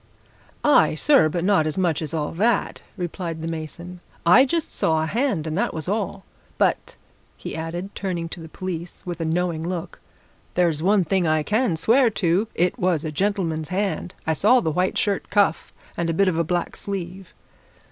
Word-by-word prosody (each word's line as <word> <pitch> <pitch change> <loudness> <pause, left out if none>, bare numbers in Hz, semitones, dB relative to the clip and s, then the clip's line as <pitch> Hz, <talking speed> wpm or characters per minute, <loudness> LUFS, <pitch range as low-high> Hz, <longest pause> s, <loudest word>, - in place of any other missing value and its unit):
"Aye, 220 - +5
sir, 270 - +4
but 170 +2 -2
not 185 -5 +3
as 155 - -3
much 175 -5 +1
as 155 -2 -4
all 155 -2 -2
that!" 220 +8 0 0.2
replied 170 -2 -4
the - - -3
mason. 165 +2 -6 0.3
"I 180 +11 +7
just 325 +4 -2
saw 160 -1 +1
a - - 0
hand 210 - 0
and 155 -1 -3
that - - -1
was 160 0 -4
all. 200 -1 -2 0.3
But," - - 0 0.4
he - - -6
added, 175 +4 -5
turning 175 -4 -3
to 170 - -8
the 165 -1 -9
police 175 -1 -6
with 175 -2 -5
a - - -1
knowing 170 0 0
look, 170 0 -5 0.6
"there's 170 -4 +2
one 195 +2 +3
thing 175 +1 +1
I 155 -1 +2
can 215 0 +1
swear 230 +10 +4
to 190 0 +1
it 180 +8 +1
was 175 -5 +1
a 155 - -3
gentleman's 165 -3 -1
hand! 190 -1 -2
I 160 - +1
saw 220 - +4
the 160 -8 -1
white 180 +4 0
shirt 200 -2 -1
cuff 200 -4 +1 0.2
and 170 -1 -1
a 165 - 0
bit 195 +3 +3
of 185 - +1
a - - +3
black 175 +1 -2
sleeve!" 190 -2 -6
175 Hz, 190 wpm, -23 LUFS, 160-195 Hz, 0.6 s, I